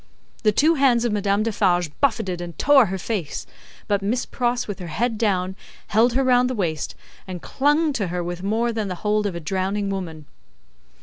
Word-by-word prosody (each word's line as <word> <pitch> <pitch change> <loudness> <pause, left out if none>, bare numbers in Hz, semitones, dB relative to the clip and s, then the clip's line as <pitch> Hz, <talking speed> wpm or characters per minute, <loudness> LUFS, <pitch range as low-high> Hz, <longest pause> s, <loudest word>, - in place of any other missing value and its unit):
The 215 - +4
two 305 +10 +4
hands 260 -5 +3
of 235 - +1
Madame 205 0 +1
Defarge 180 -7 +1
buffeted 190 -10 +1
and 170 -2 -7
tore 275 -5 +5
her 190 +1 -3
face; 185 -6 -3 0.4
but, 205 -1 +1
Miss 235 +6 -1
Pross, 245 -1 -1
with 205 -2 -5
her 180 - -6
head 225 +8 -1
down, 190 -4 0 0.3
held 230 +3 +4
her 270 +2 +2
round 250 -1 +4
the 255 - -2
waist, 165 -7 -2 0.3
and 185 -1 -5
clung 295 - +1
to 205 -8 -1
her 175 0 -2
with 175 0 -5
more 225 +4 0
than 220 -2 -2
the 185 - -3
hold 210 0 +2
of 190 - -4
a - - -3
drowning 195 +4 -1
woman. 165 -6 -5
205 Hz, 195 wpm, -23 LUFS, 185-240 Hz, 0.4 s, tore